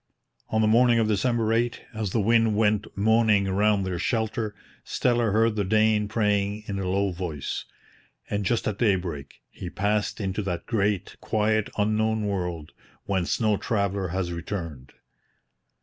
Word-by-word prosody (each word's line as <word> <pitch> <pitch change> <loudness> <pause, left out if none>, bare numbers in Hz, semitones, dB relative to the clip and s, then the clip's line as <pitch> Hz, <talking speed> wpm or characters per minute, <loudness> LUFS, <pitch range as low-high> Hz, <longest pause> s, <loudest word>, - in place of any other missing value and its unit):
On 110 - +1
the 110 - +3
morning 120 +2 +5
of 115 -1 +2
December 110 +1 +1
8, 120 +1 0
as 110 -2 -2
the 110 - 0
wind 115 0 +3
went 105 0 +2
moaning 110 -1 +3
round 100 +1 +2
their 90 -2 -3
shelter, 110 -1 -1 0.3
Steller 120 -3 +1
heard 110 +1 +2
the 105 - 0
Dane 110 +1 +2
praying 105 -1 0
in 100 -2 -4
a 95 -1 -2
low 100 +1 +1
voice. 85 -5 -4 0.6
And 105 0 -2
just 110 +4 0
at 105 -2 -2
daybreak 90 - -1
he 90 - -7
passed 105 +4 -1
into 95 0 -2
that 90 -4 -4
great, 105 -3 -1
quiet 110 0 +1
Unknown 110 +1 +1
World 90 -6 -3 0.3
whence 95 -3 -1
no 110 -3 +2
traveller 100 -3 -1
has 90 0 -2
returned. 85 -6 -6
105 Hz, 150 wpm, -26 LUFS, 95-110 Hz, 0.6 s, morning